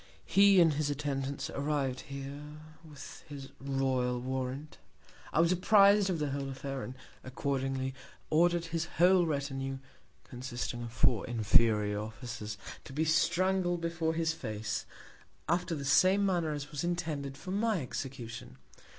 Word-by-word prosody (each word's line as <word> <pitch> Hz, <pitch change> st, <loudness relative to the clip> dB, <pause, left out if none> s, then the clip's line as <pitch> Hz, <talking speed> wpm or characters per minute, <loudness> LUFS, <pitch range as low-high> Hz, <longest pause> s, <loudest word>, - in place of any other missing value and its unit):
He 200 Hz, -1 st, +6 dB
and 165 Hz, -3 st, +6 dB
his 145 Hz, 0 st, 0 dB
Attendants 140 Hz, -1 st, -3 dB
arriv'd 140 Hz, -3 st, -1 dB
here 140 Hz, +1 st, -7 dB, 0.4 s
with 150 Hz, -3 st, -11 dB
his 140 Hz, -2 st, -8 dB
Royal 130 Hz, -2 st, 0 dB
Warrant. 130 Hz, +3 st, -4 dB, 0.5 s
I -, -, +1 dB
was 165 Hz, +1 st, +4 dB
appriz'd 200 Hz, +1 st, +5 dB
of 180 Hz, -, 0 dB
the 150 Hz, -2 st, -1 dB
whole 140 Hz, 0 st, -3 dB
Affair, 135 Hz, 0 st, -5 dB
and, 125 Hz, -, -6 dB, 0.3 s
accordingly, 130 Hz, 0 st, -2 dB, 0.4 s
order'd 170 Hz, +2 st, +3 dB
his 165 Hz, 0 st, -2 dB
whole 180 Hz, 0 st, +5 dB
Retinue, 135 Hz, -2 st, -2 dB, 0.5 s
consisting 125 Hz, -1 st, -5 dB
of 120 Hz, -1 st, -6 dB
four 115 Hz, -2 st, +2 dB
inferior 110 Hz, -2 st, +3 dB
Officers, 110 Hz, 0 st, -6 dB, 0.3 s
to -, -, -10 dB
be 155 Hz, +3 st, 0 dB
strangled 175 Hz, +2 st, +2 dB
before 165 Hz, -1 st, -1 dB
his 165 Hz, 0 st, +1 dB
Face, 110 Hz, -7 st, -4 dB, 0.6 s
after 175 Hz, 0 st, 0 dB
the 140 Hz, -2 st, -5 dB
same 185 Hz, +8 st, +5 dB
Manner 175 Hz, -5 st, +1 dB
as 145 Hz, 0 st, -6 dB
was 145 Hz, +1 st, -3 dB
intended 155 Hz, -6 st, -2 dB
for 185 Hz, -, -7 dB
my 210 Hz, 0 st, +1 dB
Execution. 125 Hz, -, -6 dB
140 Hz, 140 wpm, -31 LUFS, 130-170 Hz, 0.6 s, He